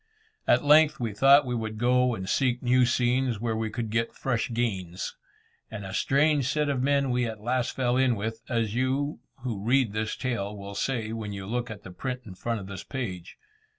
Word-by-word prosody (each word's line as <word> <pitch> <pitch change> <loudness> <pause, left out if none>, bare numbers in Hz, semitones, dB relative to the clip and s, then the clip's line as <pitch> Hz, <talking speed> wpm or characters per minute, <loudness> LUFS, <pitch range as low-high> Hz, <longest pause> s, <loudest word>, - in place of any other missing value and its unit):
At - - +4
length 155 +1 +6
we 115 -4 -2
thought 135 +6 +6
we 125 - -2
would 110 -2 -3
go 125 +1 +3
and 95 -3 -6
seek 125 +1 +1
new 125 0 +4
scenes 125 -1 +1
where 115 0 -1
we 110 0 -1
could 115 0 -4
get 115 +1 -1
fresh 120 -4 -1
gains. 95 -7 -2 0.5
And 105 -3 -7
a 95 - -6
strange 140 +2 +2
set 150 0 +1
of 135 -3 0
men 140 0 +2
we 125 -1 +1
at 110 -2 -6
last 125 +3 -1
fell 125 -1 +1
in 130 -2 +3
with, 110 +2 -4
as 115 -4 0
you 135 +4 0 0.2
who 110 -6 -3
read 120 -2 +2
this 110 0 -2
tale 105 -5 -3
will 100 0 -8
say 110 +1 -2
when 110 -2 -4
you 100 -1 -6
look 120 +4 -2
at 105 -2 -8
the 95 - -9
print 125 +7 -4
in 100 - -9
front 115 +4 -3
of 95 - -8
this 95 0 -7
page. 95 -10 -5
120 Hz, 210 wpm, -27 LUFS, 110-130 Hz, 0.5 s, length